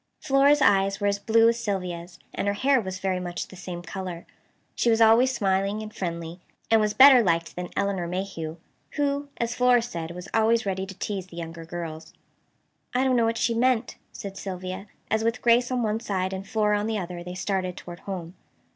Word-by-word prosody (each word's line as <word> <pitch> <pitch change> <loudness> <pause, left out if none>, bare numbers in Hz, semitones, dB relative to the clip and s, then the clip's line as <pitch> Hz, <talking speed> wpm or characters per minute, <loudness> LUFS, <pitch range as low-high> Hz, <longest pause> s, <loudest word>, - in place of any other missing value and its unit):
Flora's 280 0 +4
eyes 195 -3 +3
were 205 - -2
as 200 0 +1
blue 225 +2 +4
as 230 0 +2
Sylvia's, 180 -4 -4 0.2
and - - -2
her 200 - +1
hair 265 +3 +3
was 190 -2 -5
very 185 -1 -1
much 175 -1 -5
the - - -12
same 180 -1 -7
color. 180 -1 -6 0.5
She 240 - +1
was 225 0 +3
always 230 +3 +6
smiling 195 -1 0
and 215 0 -10
friendly, 170 -1 -4 0.3
and 225 -1 +6
was 210 0 0
better 265 -2 +9
liked 170 -5 0
than 180 0 -5
Elinor 195 -3 0
Mayhew, 170 -3 -4 0.4
who, 285 0 -1
as 235 0 -1
Flora 245 -1 +4
said, 170 -9 -5
was 180 0 -8
always 225 +1 +3
ready 190 -1 -2
to 190 -1 -10
tease 195 -3 -4
the 170 - -13
younger 165 0 -7
girls. 165 -1 -7 0.8
"I 255 - +3
don't 260 -1 +2
know 235 -1 +3
what 225 0 0
she 235 - +1
meant," 245 0 +1
said 195 -1 -8
Sylvia 185 +1 -6 0.2
as, 220 0 +2
with 230 +2 0
Grace 240 +1 +3
on 250 -2 0
one 215 0 0
side 190 -4 -2
and 190 +1 -6
Flora 210 -1 +1
on 210 - -2
the 220 -1 -1
other, 175 -2 -5
they 180 +1 -7
started 185 -1 -2
toward 175 0 -9
home. 180 -3 -6
200 Hz, 205 wpm, -26 LUFS, 180-230 Hz, 0.8 s, better